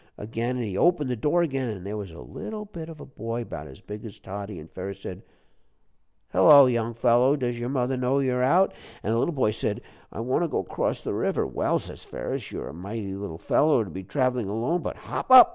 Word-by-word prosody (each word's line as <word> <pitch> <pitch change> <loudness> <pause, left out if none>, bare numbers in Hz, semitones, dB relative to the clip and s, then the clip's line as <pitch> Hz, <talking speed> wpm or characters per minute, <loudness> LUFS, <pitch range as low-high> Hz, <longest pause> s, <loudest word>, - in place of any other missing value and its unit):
again, 115 +4 -2
and 125 -2 -2
he 100 -3 -4
opened 150 - +3
the - - 0
door 150 +9 +2
again, 135 -6 -1
an' 100 -5 -5
there 100 +2 -4
was 100 -3 -5
a 80 - -11
little 210 - -6
bit 165 -5 -8
of 160 -2 -10
a - - -8
boy, 115 -2 -4
'bout 80 -8 -7
as 65 - -13
big 105 0 -8
as 110 -3 -8
Toddie. 100 0 -6
An' 75 - -10
Ferus 95 +3 -6
said, 90 - -6 1.1
'Hello, 140 - +9
young 120 -2 0
fellow, 120 +3 +4
does 120 -4 -2
your 120 +1 -2
mother 130 -1 0
know 130 +2 +1
you're 130 -2 +1
out?' 175 +9 +4 0.3
An' 105 - 0
the 115 - +2
little 170 +5 0
boy 125 -6 +2
said, 105 -1 -2 0.3
'I 110 - -5
want 130 +8 +1
to - - +1
go - - -1
'cross - - -2
the - - -2
river.' - - 0
'Well,' - - +1
says - - -8
Ferus, - - -5
'you're - - -5
a - - -8
mighty 100 +3 -5
little 95 -4 -5
fellow 145 - +3
to 100 - -9
be 95 - -5
travelin' 125 0 0
alone, 120 - 0
but - - -4
hop - - -5
up.' 260 +6 +11
120 Hz, 230 wpm, -26 LUFS, 100-135 Hz, 1.1 s, up